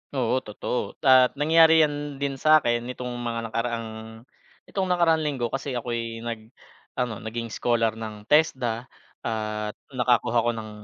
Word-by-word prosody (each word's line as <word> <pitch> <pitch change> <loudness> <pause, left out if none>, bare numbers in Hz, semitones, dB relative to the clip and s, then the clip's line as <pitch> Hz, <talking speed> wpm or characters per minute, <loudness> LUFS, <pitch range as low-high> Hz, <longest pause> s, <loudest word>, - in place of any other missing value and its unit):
Oo 130 0 +1
totoo 115 +1 -4
at 130 -1 +6
nangyari 160 +2 +6
yan 145 -1 -2
din 135 -1 -3
sa 155 0 +5
akin 120 0 +2
nitong 125 0 -5
mga 115 -1 -4
nakaraang, 115 0 -2 0.8
nitong 190 -2 -3
nakaraang 170 -3 +3
linggo 140 -6 -2
kasi 135 -1 -3
ako 120 0 -3
ay 115 -1 -4
nag 115 -2 -4 0.5
ano 120 -4 -2
naging 115 +1 -5
scholar 115 0 +1
ng 110 -1 -8
TESDA 130 -6 +2 0.4
at 105 -1 -3 0.2
nakakuha 120 -2 +2
ako 120 +1 +1
ng 110 -1 -6
120 Hz, 150 wpm, -25 LUFS, 115-140 Hz, 0.8 s, at